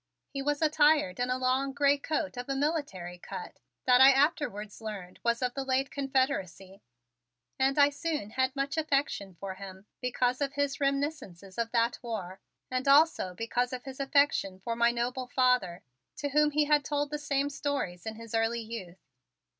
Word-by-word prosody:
He 275 - -3
was 290 +2 0
attired 300 -10 +3
in 245 0 0
a 255 - +1
long 260 +2 0
gray 285 0 +3
coat 305 0 -2
of 245 +2 -6
a 275 - 0
military 270 - -2
cut 445 - -8 0.3
that 250 0 +6
I 270 +1 +10
afterwards 270 - 0
learned 200 -5 -7
was 235 +1 +1
of 250 -1 0
the 275 - -3
late 265 0 0
Confederacy, 260 - -2 0.8
and 270 +1 +2
I 285 0 +6
soon 295 -7 -3
had 260 +2 0
much 275 +2 -2
affection 275 - 0
for 195 -1 -5
him 190 0 -10 0.2
because 250 +1 0
of 280 -1 -1
his 285 +1 -1
reminiscences 275 - -2
of 230 -1 0
that 235 0 +1
war 200 -6 -5 0.3
and 255 +2 -1
also 280 - +4
because 245 +4 -1
of 250 -1 -5
his 265 0 -9
affection 275 -9 +2
for 230 +4 -3
my 235 0 +4
noble 245 +2 -2
father, 250 -9 +1 0.3
to 290 -1 -3
whom 300 +1 +4
he 300 0 +2
had 295 -1 +3
told 290 0 -1
the 300 - -2
same 285 -1 0
stories' 275 -11 -3
in 220 - -4
his 230 0 -10
early 225 +1 +1
youth. 220 -6 -8
260 Hz, 180 wpm, -29 LUFS, 225-285 Hz, 0.8 s, I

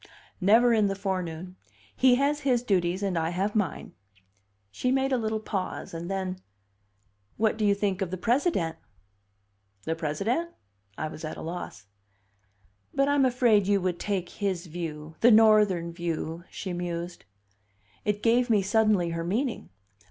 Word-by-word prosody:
"Never 230 +5 +5
in 215 -2 +3
the 195 - -1
forenoon. 185 -2 -4 0.4
He 255 -1 +5
has 285 +3 +1
his 255 -4 +1
duties 185 -3 0
and 195 -3 -1
I 160 0 0
have 190 +4 -1
mine." 210 -5 -2 0.8
She 250 - -1
made 270 +1 +1
a 260 - +3
little 220 -1 -1
pause, 195 -5 -4
and 170 +1 -5
then, 190 -1 -3 1.0
"What 220 0 +2
do 220 - -3
you 200 -1 +4
think 200 -1 -1
of 190 - -1
the 185 - -4
President?" 230 - 0 1.1
"The 160 - -1
President?" 195 - -1 0.5
I 155 - -2
was 155 - -9
at 155 - -5
a - - -7
loss. 165 - -6 1.1
"But 275 +1 +3
I'm 285 -2 +4
afraid 240 -6 +3
you 200 -1 +3
would 180 -1 -1
take 195 -4 -2
his 190 -4 -3
view 155 -2 -6
the 240 - +6
Northern 210 -6 +5
view," 170 0 -4
she 185 -2 -5
mused. 175 0 -5 0.8
It 210 0 -1
gave 240 +2 +3
me, 210 -3 +3
suddenly, 205 -3 +2
her 165 0 -3
meaning. 230 +9 -2
195 Hz, 155 wpm, -27 LUFS, 175-225 Hz, 1.1 s, the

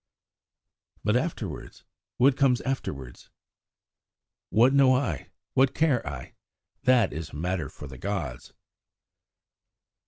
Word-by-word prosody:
"But 105 +3 +2
afterwards? 125 - -3 0.3
What 130 +2 +5
comes 130 -3 +3
afterwards?" 70 - -5 1.2
"What 120 +6 +5
know 135 -2 +6
I? 110 - -2 0.2
What 130 0 +3
care 155 -7 +3
I? 65 -4 -6 0.5
That 125 - +4
is 80 0 -5
a - - -11
matter 90 +2 -2
for - - -11
the 65 -2 -10
gods." 85 -11 -4
110 Hz, 105 wpm, -27 LUFS, -, 1.2 s, know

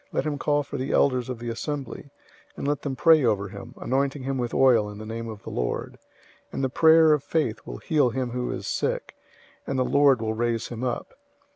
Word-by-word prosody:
Let - - -1
him 145 -2 -2
call 145 0 +1
for - - -6
the 130 +2 -2
elders 130 -3 +2
of 125 - -3
the 120 +1 -5
assembly, 140 +3 -5 0.5
and - - -3
let 145 0 0
them 140 -2 -3
pray 160 0 +5
over 100 -4 +1
him, 100 +1 -10
anointing 135 +1 -1
him 135 0 -2
with 120 -1 -2
oil 120 -6 +4
in 105 - -9
the 110 - -8
name 115 +1 -5
of 105 -2 -9
the - - -7
Lord, - - -3 0.5
005:015 - - -35
and - - -2
the 130 - +1
prayer 160 +2 +6
of 150 -2 0
faith 150 -9 -1
will - - -6
heal 145 - +2
him 125 0 -3
who 125 0 -3
is - - -5
sick, - - -2 0.5
and 135 - -1
the 130 - +2
Lord 140 -2 +4
will 110 0 -2
raise 115 0 -1
him 120 0 -6
up. 125 -2 -3
130 Hz, 230 wpm, -25 LUFS, 115-140 Hz, 0.5 s, prayer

